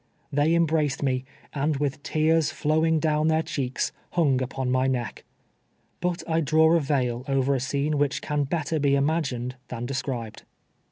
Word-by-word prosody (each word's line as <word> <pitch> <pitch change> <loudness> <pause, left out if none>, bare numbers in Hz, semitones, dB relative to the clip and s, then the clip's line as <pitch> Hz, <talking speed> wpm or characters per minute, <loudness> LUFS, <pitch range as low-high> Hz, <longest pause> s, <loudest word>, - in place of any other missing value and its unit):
1'liey 150 +3 +3
embraced 155 -4 +1
me, 130 -2 0 0.3
and 145 +1 0
with 145 0 -2
tears 160 +1 +2
flowing 160 +2 +2
down 155 0 +1
their 160 0 +2
cheeks, 135 -5 -2 0.2
hung 145 -7 +2
upon 130 0 -2
my 130 +1 +2
neck. 125 -3 -2 0.8
But 180 0 -2
I 165 0 +1
draw 160 +2 +4
a - - +4
veil 130 -5 0
over 135 0 +2
a 135 - +1
scene 140 +3 -1
which 145 -1 +1
can 150 -1 -1
better 160 +1 -1
be 140 -1 +3
imagined 140 -4 -1
than 120 -1 -5
described. 125 -4 -4
145 Hz, 160 wpm, -25 LUFS, 130-160 Hz, 0.8 s, draw